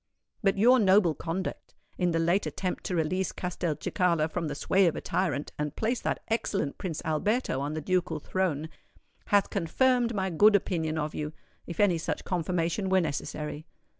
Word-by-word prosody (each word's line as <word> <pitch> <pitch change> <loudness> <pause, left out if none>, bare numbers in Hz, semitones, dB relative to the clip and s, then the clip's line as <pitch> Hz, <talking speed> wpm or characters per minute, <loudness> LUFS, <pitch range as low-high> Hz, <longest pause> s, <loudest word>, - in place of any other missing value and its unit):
But 195 -1 +2
your 245 +5 +6
noble 190 -4 +5
conduct 170 +5 -5 0.2
in 180 -1 +1
the 165 - 0
late 170 +4 +2
attempt 185 -2 -3
to 180 - -1
release 180 +4 0
Castelcicala 170 -1 -1
from 165 0 -2
the 145 - -4
sway 190 +5 +3
of 165 - +1
a - - -3
tyrant, 155 -6 -1
and 150 0 -2
place 230 +2 -1
that - - -2
excellent 200 -9 -1
Prince 170 -5 -4
Alberto 165 - 0
on 145 +2 -3
the 155 - -3
ducal 175 -1 0
throne, 160 -3 -1 0.6
has 205 -1 +4
confirmed 235 +6 +1
my 190 -1 -1
good 205 +6 +6
opinion 160 -5 0
of 150 0 -2
you—if 155 +2 -8
any 185 -5 +4
such - - -3
confirmation 180 +2 -1
were 190 0 +4
necessary. 150 0 -4
175 Hz, 165 wpm, -28 LUFS, 155-195 Hz, 0.6 s, your